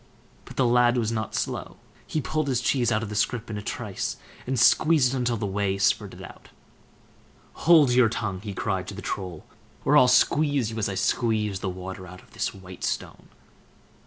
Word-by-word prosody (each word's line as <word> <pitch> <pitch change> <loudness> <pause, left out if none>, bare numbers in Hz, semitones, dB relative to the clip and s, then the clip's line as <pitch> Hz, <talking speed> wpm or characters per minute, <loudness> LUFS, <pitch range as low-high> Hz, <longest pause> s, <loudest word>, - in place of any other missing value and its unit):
But - - -12
the 130 - +3
lad 120 0 +4
was 115 -2 0
not 110 -2 -3
slow; - - -3 0.3
he 155 - -1
pulled 155 +2 -2
his 130 -3 +1
cheese 125 -1 +1
out 110 0 +1
of 110 - -5
the 105 - -6
scrip 115 +1 -1
in 105 - -4
a - - -6
trice, - - -4 0.3
and 130 -1 0
squeezed 145 +1 +4
it 125 -2 -1
till 120 -1 0
the 105 - -3
whey 100 0 -1
spurted 100 0 0
out. - - -13 1.2
"Hold 155 -7 +7
your 125 -2 +5
tongue!" 100 -5 -3
he 100 -2 -6
cried 95 -2 -2
to 100 - -7
the 100 - -8
Troll, 90 -4 -5 0.4
"or - - +4
I'll 130 - +7
squeeze 135 -1 +3
you 110 - -5
as 105 -1 0
I 95 - -4
squeeze 105 -1 0
the 95 - -3
water 95 0 -7
out 90 +1 -12
of - - -24
this - - -2
white 95 -1 -12
stone." - - -4
110 Hz, 200 wpm, -25 LUFS, 100-125 Hz, 1.2 s, Hold